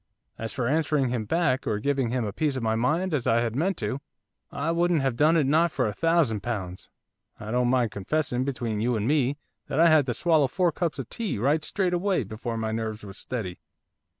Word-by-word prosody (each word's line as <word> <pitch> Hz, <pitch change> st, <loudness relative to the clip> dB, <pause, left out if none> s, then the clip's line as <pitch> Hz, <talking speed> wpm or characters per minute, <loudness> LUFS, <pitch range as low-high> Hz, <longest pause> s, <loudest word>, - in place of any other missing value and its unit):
As 115 Hz, -1 st, -4 dB
for 125 Hz, -3 st, -2 dB
answering 150 Hz, -2 st, +1 dB
him 120 Hz, -3 st, -2 dB
back, 135 Hz, 0 st, +1 dB
or 105 Hz, -, +1 dB
giving 135 Hz, +1 st, 0 dB
him 125 Hz, -1 st, -1 dB
a 100 Hz, -, -4 dB
piece 150 Hz, +3 st, 0 dB
of 130 Hz, -, -3 dB
my 110 Hz, 0 st, +1 dB
mind, 155 Hz, +11 st, 0 dB
as 135 Hz, -5 st, 0 dB
I 115 Hz, +1 st, +3 dB
had 115 Hz, -1 st, -2 dB
meant 180 Hz, +6 st, 0 dB
to, 120 Hz, +5 st, -3 dB, 0.5 s
I 165 Hz, -, -1 dB
wouldn't 170 Hz, -3 st, +2 dB
have 135 Hz, -3 st, 0 dB
done 155 Hz, +5 st, +4 dB
it 155 Hz, -, +3 dB
not 160 Hz, +5 st, +3 dB
for 135 Hz, -4 st, -1 dB
a 105 Hz, -, -1 dB
thousand 165 Hz, -8 st, +2 dB
pounds. 95 Hz, -6 st, -5 dB, 0.5 s
I 105 Hz, 0 st, -6 dB
don't 125 Hz, 0 st, +2 dB
mind 125 Hz, -4 st, +2 dB
confessing, 125 Hz, +4 st, -1 dB
between 120 Hz, -5 st, -2 dB
you 120 Hz, +2 st, +1 dB
and 110 Hz, 0 st, -1 dB
me, 145 Hz, -1 st, +2 dB, 0.3 s
that 135 Hz, -, -2 dB
I 170 Hz, 0 st, +7 dB
had 155 Hz, -4 st, +4 dB
to 120 Hz, -, -1 dB
swallow 160 Hz, -1 st, +3 dB
four 175 Hz, +5 st, +1 dB
cups 165 Hz, 0 st, -2 dB
of 135 Hz, -4 st, -5 dB
tea, 225 Hz, -, -2 dB
right 145 Hz, +8 st, +1 dB
straight 185 Hz, 0 st, -1 dB
away, 180 Hz, -3 st, +1 dB
before 115 Hz, +3 st, -5 dB
my 110 Hz, 0 st, -2 dB
nerves 110 Hz, -1 st, -3 dB
was 95 Hz, -1 st, -9 dB
steady. 105 Hz, -8 st, -5 dB
130 Hz, 225 wpm, -26 LUFS, 115-155 Hz, 0.5 s, I